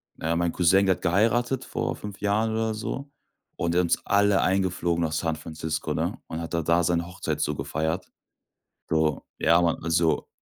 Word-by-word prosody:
na 80 - -4
ja, 85 - +2
mein 85 -1 0
Cousin, 95 +3 +4
der 95 -1 +3
hat - - -18
geheiratet 120 +8 +1
vor - - -3
5 105 -1 -8
Jahren 105 +2 +1
oder 110 0 0
so 135 +6 -5 0.5
und 85 0 0
der 90 - +4
hat - - 0
uns 85 - 0
alle 100 0 +3
eingeflogen 90 -2 +1
nach 80 - -1
San 80 0 -1
Francisco, 80 0 -4
ne, - - -2
und 80 - -5
hat 85 0 -6
dann 85 -1 0
da 85 +2 +3
seine 85 0 +1
Hochzeit 90 - -3
so 75 - 0
gefeiert. 80 +5 -2 0.8
Bro, 80 -2 +1
ja, 85 +2 +4
Mann, 85 -2 0
also 85 0 +1
85 Hz, 195 wpm, -26 LUFS, 80-100 Hz, 0.8 s, Cousin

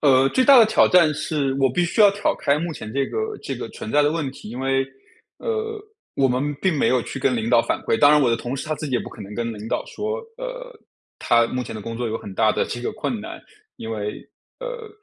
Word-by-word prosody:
呃， 135 -2 +5
最 260 - +2
大 275 -1 +8
的 230 - +9
挑 220 - +4
战 170 -4 +5
是 150 -2 -1
我 135 -1 +4
必 175 +8 +1
须 175 +6 -1
要 205 -1 +8
挑 200 +1 0
开 140 +1 +1
目 170 +1 -3
前 110 -7 -8
这 135 0 0
个 440 -1 -3
这 - - -4
个 - - -6
存 - - -7
在 150 - +4
的 145 +1 +2
问 160 -4 -2
题。 120 - -11
因 120 +3 -6
为， 135 0 +1 0.5
呃， 445 -1 -3 0.4
我 135 -1 +3
们 135 +4 -1
并 185 -5 +2
没 - - +2
有 125 -2 +2
去 135 - -6
跟 130 -1 +1
领 115 +1 -2
导 120 -2 +6
反 - - -1
馈， 115 - 0
当 145 - +7
然 150 0 +5
我 125 -4 +3
的 115 - +2
同 125 +3 -4
事 - - -5
他 155 - -1
自 150 +1 -5
己 135 - -6
也 120 - +2
不 - - -7
可 - - -13
能 100 +1 -8
跟 115 0 -2
领 105 0 -8
导 - - -2
说， 440 +3 -3 0.2
呃， - - -7 0.5
他 115 -1 +3
目 125 0 -3
前 110 - -7
的 110 - -6
工 115 +2 -5
作 120 0 -2
有 110 - -2
很 100 - -9
大 110 +1 +3
的 - - 0
这 120 - -5
个 125 - -3
困 220 +1 -3
难。 215 - -8 0.4
因 110 - -7
为， 105 -1 -5 0.3
呃， - - -6
140 Hz, 290 characters per minute, -22 LUFS, -, 0.5 s, 的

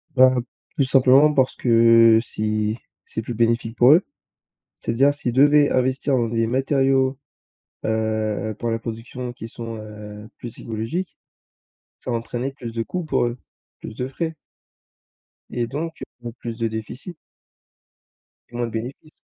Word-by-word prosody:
Ben, 130 -1 +5 0.3
tout 140 - +2
simplement 135 +3 +5
parce 130 -2 +2
que, 115 -1 +6
si 110 -1 -2 0.3
c'est 110 - -4
plus 120 +2 -5
bénéfique 115 0 0
pour 125 +4 +7
eux. 175 +5 +5 0.8
C'est-à-dire, 135 +5 +2
s'ils 125 -4 -3
devaient 145 +3 +5
investir 130 +2 +1
dans 120 -2 +1
des 115 0 0
matériaux, 135 +1 +2 0.7
heu, 110 -1 -1
pour 120 - -1
la 115 - -1
production 120 +2 -6
qui 115 - -8
sont, 115 0 -7
heu, 105 0 -10
plus 120 - -9
écologiques, 115 - -4 0.8
ça 125 - -5
va 115 - +1
entraîner 120 +3 -4
plus 120 -4 -8
de 115 0 -1
coûts 180 +7 -4
pour 155 - +1
eux, 120 +1 -3 0.4
plus 110 - -9
de 125 - -3
frais 160 +4 -4 1.1
et 120 -1 -2
donc 160 +5 -5 0.2
beaucoup 120 -1 -6
plus 115 -1 -6
de 115 -1 0
déficit 110 - -6 1.3
et 120 - -13
moins 120 0 0
de 115 - -6
bénéfices. 125 +7 -7
120 Hz, 150 wpm, -22 LUFS, 115-135 Hz, 1.3 s, pour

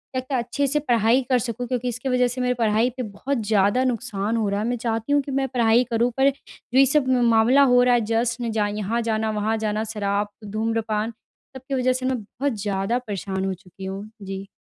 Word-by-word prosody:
जाके 255 +1 -2
अच्छे-से 275 +4 0
पढ़ाई 240 -2 +3
कर 255 -1 +4
सकूँ 245 +1 -4
क्योंकि 250 0 -2
इसके 245 +2 -3
वज़ह 250 -1 +3
से 250 +1 -4
मेरी 250 0 +1
पढ़ाई 225 +1 +2
पे 255 - -2
बहुत 235 +6 -3
ज़्यादा 205 +4 +3
नुकसान 230 -3 -1
हो 220 - 0
रहा 200 - -1
है। 215 - -1
मैं 245 0 -1
चाहती 225 +3 -2
हूँ 290 - +4
कि 275 - -7
मैं 270 0 0
पढ़ाई 240 -1 +3
करूँ, 235 +2 +2
पर 270 +1 +5
जो 265 -2 -4
ये 275 - +8
सब 270 0 +2
म 250 -2 +3
मामला 230 +5 +5
हो 245 - +6
रहा 250 0 +4
है, 240 - +2
जश्न 230 +1 -1
जा 215 -1 +1
यहाँ 210 +3 -2
जाना 220 -1 -1
वहाँ 215 +1 0
जाना, 215 0 -1
शराब, 205 -1 -1 0.2
धूम्रपान, 220 0 -1 0.5
सब 260 - -12
की 275 - -1
वज़ह 255 0 +2
से 255 0 -3
मैं 260 -1 0
बहुत 270 +6 -3
ज़्यादा 200 +3 0
परेशान 190 -1 -3
हो 190 - -1
चुकी 190 0 -12
हूँ। 195 +2 -5 0.2
जी। 195 0 -6
230 Hz, 220 wpm, -23 LUFS, 210-255 Hz, 0.5 s, ये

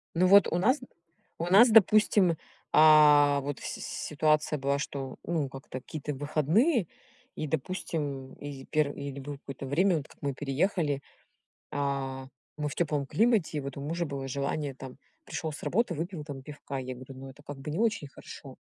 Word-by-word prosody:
Ну 185 +2 +4
вот 200 +1 +7
у 175 - 0
нас, 255 +10 +3 0.6
у 165 - -2
нас, 205 +7 +7
допустим, 210 -4 +5 0.4
а, 150 -2 +7
вот 145 -1 -4
с - - -10 0.2
ситуация 155 0 0
была, 140 +1 0
что, 135 -2 -5
ну, 155 -5 -1
как-то 135 -1 -8
какие-то 150 -1 -5
выходные, 160 - +2 0.5
и, 155 - -3
допустим, 145 -3 -3
и 140 -2 -8
перв 150 -2 0
или 140 -1 -6
было 145 +1 -6
какое-то 135 -1 -8
время, 170 +5 +2
вот 140 - -9
как - - -20
мы 140 -2 -1
переехали, 145 +1 0 0.7
а, 135 -2 -3 0.3
мы 150 -1 -2
в - - -6
тёплом 150 -4 -1
климате, 215 - +2
и - - -1
вот 140 0 -7
у - - -5
мужа 165 +4 -2
было 135 -1 -5
желание 140 +1 -2
там: 130 -1 -10 0.3
пришёл 160 -2 -4
с - - -9
работы, 210 -3 0
выпил 165 0 -5
там 140 -3 -8
пивка. 145 -2 -7
Я 130 0 -5
ему 130 +1 -9
там: 130 0 -11
"Ну, 135 - -8
это 145 +2 -17
как 145 -1 -8
бы 140 +3 -6
не 160 - -3
очень 220 -10 0
хорошо. - - -11
145 Hz, 185 wpm, -29 LUFS, 140-170 Hz, 0.7 s, вот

